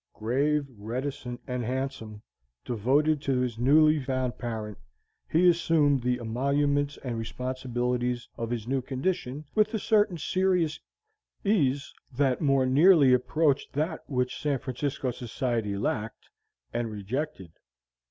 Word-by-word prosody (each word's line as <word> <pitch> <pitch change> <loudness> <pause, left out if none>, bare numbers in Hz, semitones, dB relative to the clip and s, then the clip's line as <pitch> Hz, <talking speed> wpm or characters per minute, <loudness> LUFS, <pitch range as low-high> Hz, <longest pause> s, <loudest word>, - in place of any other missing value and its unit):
Grave, 140 +6 +1
reticent, 125 +3 -4
and 125 -1 -3
handsome, 125 -4 -4 0.4
devoted 140 +6 +2
to 135 -3 0
his 120 -3 -2
newly 155 +4 +5
found 130 -2 -2
parent, 110 -3 -5 0.5
he 175 +3 +4
assumed 165 -5 +3
the 125 0 0
emoluments 140 +5 0
and 120 -4 -3
responsibilities 125 0 -2
of 115 -1 -4
his 120 -2 -3
new 135 +1 0
condition 135 +1 -3
with 215 0 +3
a - - +2
certain 205 -4 +2
serious 180 -1 +1 0.7
ease 145 -9 +1 0.2
that 135 +1 +1
more 135 -3 +3
nearly 145 0 +6
approached 145 +3 +1
that 155 +3 -1
which 125 -2 -1
San 145 -2 +1
Francisco 130 +1 -3
society 115 -3 -2
lacked, 110 +2 -3 0.4
and 120 -1 -1
rejected. 105 - -4
130 Hz, 125 wpm, -28 LUFS, 120-150 Hz, 0.7 s, nearly